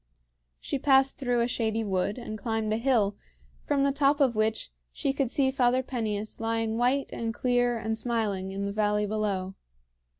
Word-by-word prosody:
She 280 - -3
passed 270 0 +3
through 245 -3 +1
a 235 - +2
shady 225 -2 -1
wood 195 +1 -1
and 235 -3 -6
climbed 220 0 -2
a - - +1
hill, 230 -5 +2 0.5
from 285 -2 +1
the 280 - +3
top 280 +1 +2
of 265 -4 +3
which 215 - -1 0.2
she 270 - -1
could 275 -3 0
see 265 0 +2
Father 255 -1 +2
Peneus 215 -5 -3
lying 225 0 -1
white 260 +3 +1
and 230 -1 -2
clear 245 -1 +1
and 220 0 -2
smiling 220 -5 -1
in 195 +1 -3
the 200 - -2
valley 210 0 +1
below. 200 -3 -2
225 Hz, 175 wpm, -28 LUFS, 215-260 Hz, 0.5 s, passed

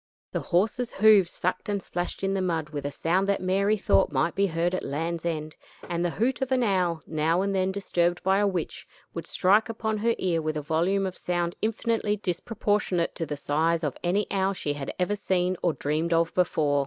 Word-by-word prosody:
The - - -1
horses' 215 +7 0
hoofs 205 -4 +5
sucked 185 +4 -3
and 200 -2 -1
splashed 175 +2 -4
in 195 0 +1
the 195 - 0
mud 165 -4 -1
with 145 -2 -4
a - - -4
sound 180 +7 0
that 200 - +2
Mary 195 +3 +1
thought 100 - +3
might 150 +5 +1
be 200 0 +2
heard 170 +1 0
at 185 - -2
Land's 165 +4 -3
End; 155 -2 -3 0.3
and 170 0 -1
the 175 - +1
hoot 245 +10 -1
of 265 0 -2
an 255 -1 +3
owl, 180 -6 +1
now 160 +3 +1
and 200 0 -1
then 190 0 +1
disturbed 175 -3 0
by 190 +1 +3
a 205 - +3
witch, 180 -5 -4 0.3
would - - -6
strike 210 +5 +3
upon 220 -1 -2
her 230 +2 +1
ear 170 -3 0
with 155 0 -2
a - - -2
volume 175 +6 +1
of 185 -1 -4
sound 175 -1 -2
infinitely 225 -1 0
disproportionate 195 -1 -1
to 165 - -4
the 145 - -4
size 160 +4 0
of 145 -4 -1
any 190 +4 +1
owl 195 0 +1
she 150 -6 -2
had 145 -2 -5
ever 185 +3 0
seen 185 -2 0
or 175 - +2
dreamed 155 +4 -1
of 165 0 +2
before. 150 -5 +2
180 Hz, 215 wpm, -26 LUFS, 165-200 Hz, 0.3 s, hoofs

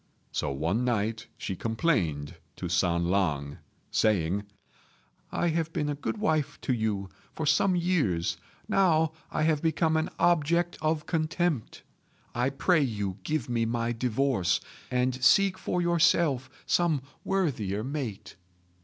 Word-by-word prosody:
So 75 - -1
one 80 - 0
night 110 -2 -1
she 95 - -4
complained 90 - 0 0.2
to 90 - -4
San 85 -1 +1
lang, 75 -7 0 0.3
saying, 100 -1 +1 0.9
"I 175 - +1
have 165 0 -1
been 150 - -1
a - - 0
good 145 +9 -3
wife 155 -8 0
to 130 - 0
you 110 -4 -1 0.3
for 160 - -3
some 155 +5 +3
years: 125 - +1 0.3
now 160 -5 +3 0.2
I 155 - -1
have 155 -2 +2
become 160 0 +2
an 160 - 0
object 170 +1 +2
of 155 0 0
contempt. 160 -4 -1 0.5
I 125 +2 +1
pray 155 +4 +2
you 105 -7 -2
give 155 -6 -2
me 115 -2 0
my 115 0 -1
divorce, 120 -5 +1 0.3
and 125 +1 0
seek 195 +5 +5
for 180 -1 -1
yourself 165 -6 +3 0.2
some 160 -6 +2 0.2
worthier 115 - -1
mate." 130 - -5
130 Hz, 135 wpm, -28 LUFS, 100-160 Hz, 0.9 s, seek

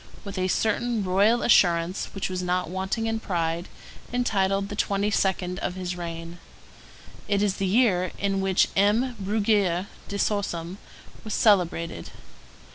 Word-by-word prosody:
with 200 -1 -6
a 185 -1 0
certain 225 +3 0
royal 200 +6 +3
assurance 175 -4 +3
which 195 - -2
was 185 -1 -3
not 180 -1 -1
wanting 190 +4 -2
in 225 0 -1
pride, 170 -4 -2 0.4
entitled 200 -5 +1
the 205 - -6
twenty 200 0 0
second 185 -2 0
of 180 - -3
his 180 -1 -4
reign. 170 0 -7 0.9
It 200 0 +1
is 200 -2 0
the 195 - -1
year 185 -4 +2
in 195 -1 0
which 190 -1 +2
M. 220 +6 +2
Bruguière 200 -3 +1 0.2
de 200 - -4
Sorsum 195 -4 -2 0.5
was 215 - -3
celebrated. 180 -5 +2
195 Hz, 140 wpm, -25 LUFS, 180-210 Hz, 0.9 s, royal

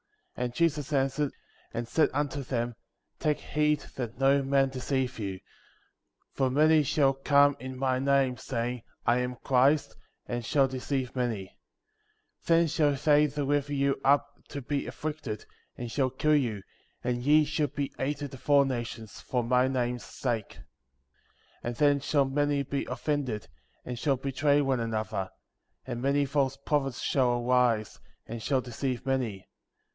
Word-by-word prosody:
5. 125 - -2
And 120 - -4
Jesus 155 -4 +1
answered, 135 +1 +1 0.4
and 115 0 -2
said 155 +4 +3
unto 145 0 -1
them: 120 -2 -2 0.5
Take 150 -1 +1
heed 150 0 +1 0.2
that 120 -3 -4
no 135 +1 +4
man 135 0 +2
deceive 130 -1 -2
you; 100 -3 -2
6. 95 - -15 0.9
For 135 -1 +1
many 155 +4 +5
shall 140 -1 +2
come 140 +1 +4
in 130 +1 -7
my 130 -1 +1
name, 135 -2 +2
saying 120 0 -3 0.2
— - - -42
I 120 +1 +3
am 125 0 -2
Christ 135 +3 +3 0.2
— - - -48
and 120 0 -3
shall 135 +3 +3
deceive 130 0 -3
many; 115 -7 -2 0.9
7. - - -31 0.2
Then 170 - +2
shall 150 -2 +2
they 150 +1 +4
deliver 145 0 -1
you 140 -1 +1
up 140 +1 +4 0.2
to 140 -2 -6
be 140 +2 -2
afflicted, 150 -9 -5 0.3
and 120 -1 -5
shall 130 0 +1
kill 150 +4 +2
you, 115 -9 0 0.4
and 120 0 -1
ye 150 +4 +5
shall 150 0 0
be 140 0 -4
hated 145 +1 -2
of 135 - -11
all 140 -1 +6
nations, 120 -4 -5
for 125 -2 -1
my 125 +2 +3
name's 125 -2 -1
sake; 115 -5 -3
8. - - -13 1.0
And 120 0 -4
then 145 +1 +3
shall 140 0 +2
many 145 +1 +1
be 140 +1 -3
offended, 135 -8 -2 0.4
and 125 -1 -5
shall 140 -1 +1
betray 140 +2 +2
one 135 -3 +1
another; 110 -4 -2 0.6
9. - - -4
And 120 - -5
many 140 +2 +2
false 135 -1 0
prophets 140 -2 -1
shall 120 -3 +1
arise, 125 -4 +2 0.3
and 115 0 -6
shall 135 +2 +1
deceive 125 +1 -3
many; 125 -7 -1
10. - - -30
135 Hz, 165 wpm, -29 LUFS, 125-145 Hz, 1.0 s, all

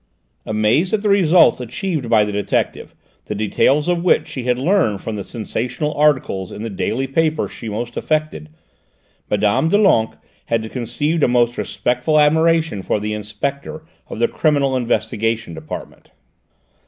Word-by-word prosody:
Amazed 110 - +2
at 210 - -4
the 210 - +1
results 180 -7 +5
achieved 140 - -3
by 110 -2 +4
the 105 - -4
detective, 100 0 -2 0.3
the 105 - -4
details 135 +8 +1
of 175 -1 0
which 180 - +3
she 130 -3 -6
had 125 -1 +1
learned 135 - +1
from 110 - -5
the 100 - -4
sensational 125 +7 -3
articles 130 -11 +1
in 105 - -7
the 115 - -4
daily 120 +6 -2
paper 155 +3 0
she 115 - -8
most 115 +3 -5
affected, 155 - -2 0.8
Mme. 105 +9 +2
Doulenques 195 - +3 0.3
had 110 -1 -2
conceived 145 +6 -2
a - - +4
most 120 -1 +2
respectful 125 +6 -1
admiration 160 -5 +3
for 105 - -1
the 105 +1 -3
Inspector 140 +9 -5 0.2
of - - -7
the 120 - +2
Criminal 140 -4 +1
Investigation 115 -3 -1
Department. 80 -1 -9
125 Hz, 150 wpm, -19 LUFS, 110-155 Hz, 0.8 s, results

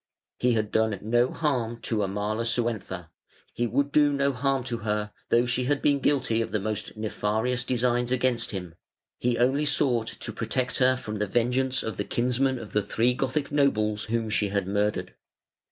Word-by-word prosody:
"He 125 -1 +3
had 110 -2 -1
done 110 -2 +1
no 120 +3 +2
harm 120 -7 -1
to 110 -2 -1
Amalasuentha; 110 -2 -2 0.4
he 120 - 0
would 140 +5 0
do 145 0 +4
no 140 0 +1
harm 135 0 0
to 120 -2 -4
her, 105 -1 -2 0.2
though 120 +1 +4
she 125 +1 0
had 145 +2 +1
been 140 0 +2
guilty 130 -5 +1
of 115 - -3
the 105 - 0
most 105 +1 -4
nefarious 110 +3 -1
designs 125 -1 +1
against 125 -2 +1
him: 90 -5 -5 0.5
he 120 -1 +1
only 130 +5 +2
sought 125 -6 +2
to - - -4
protect 125 -1 -1
her 130 0 +5
from 110 -4 -5
the 105 - 0
vengeance 125 +4 +1
of 110 -4 -4
the 100 - -1
kinsmen 125 +4 0
of 115 -3 -9
the 105 - +3
three 115 +5 +1
Gothic 135 +3 -2
nobles 110 -7 +1
whom 115 0 -1
she 105 -1 +2
had 100 -1 -1
murdered". 105 +1 -1
120 Hz, 180 wpm, -26 LUFS, 110-130 Hz, 0.5 s, her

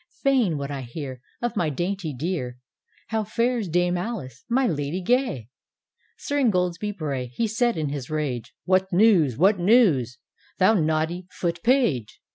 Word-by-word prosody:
Fain 250 - +3
would 140 0 -4
I 140 -1 -4
hear 130 0 -7 0.2
Of 240 0 -1
my 175 -6 +1
dainty 175 +3 -2
dearj 140 -2 -3 0.6
How 220 -1 0
fares 230 +1 0
Dame 175 +1 +1
Alice, 175 - -6
my 260 +3 +2
Lady 150 -3 -1
gay? 215 - 0 0.2
" - - -67
— - - -40
Sir 285 0 -2
Ingoldsby 185 -5 +1
Bray, 140 -5 -3
he 125 - -2
said 235 +1 +1
in 155 -2 -1
his 140 -3 -5
rage, 130 -7 -3
"What 190 +1 +2
news? 175 - +4
what 190 +5 +4
news? 175 - +4 0.4
thou 185 +4 +5
naughty 160 0 0
Foot 170 -1 -3
page." 230 - +1
175 Hz, 160 wpm, -24 LUFS, 140-220 Hz, 0.6 s, thou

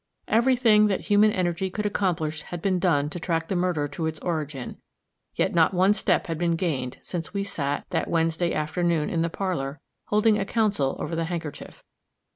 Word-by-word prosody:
Every 240 +4 +3
thing 215 -4 +5
that 195 - 0
human 210 +1 +4
energy 185 0 -1
could 210 +3 -4
accomplish 170 -7 -1
had 175 - -7
been 185 +1 +1
done 145 -5 +2
to 175 - -5
track 165 -1 -1
the 190 - 0
murder 175 -5 0
to 160 +2 -3
its 160 0 -3
origin; 155 -6 -4 0.6
yet - - +1
not 170 +2 +3
one 190 +3 +5
step 190 -3 +1
had 165 -2 -4
been 170 -1 +1
gained 140 -8 -2
since 175 +2 -5
we 200 - 0
sat, 145 -8 -3
that - - 0
Wednesday 165 +1 +1
afternoon, 160 +1 0
in 165 - 0
the 170 - +1
parlor, 160 -7 -3 0.3
holding 210 0 +3
a - - +1
council 205 - +1
over 165 - -4
the 165 0 -1
handkerchief. 165 -3 -6
175 Hz, 190 wpm, -25 LUFS, 160-195 Hz, 0.6 s, thing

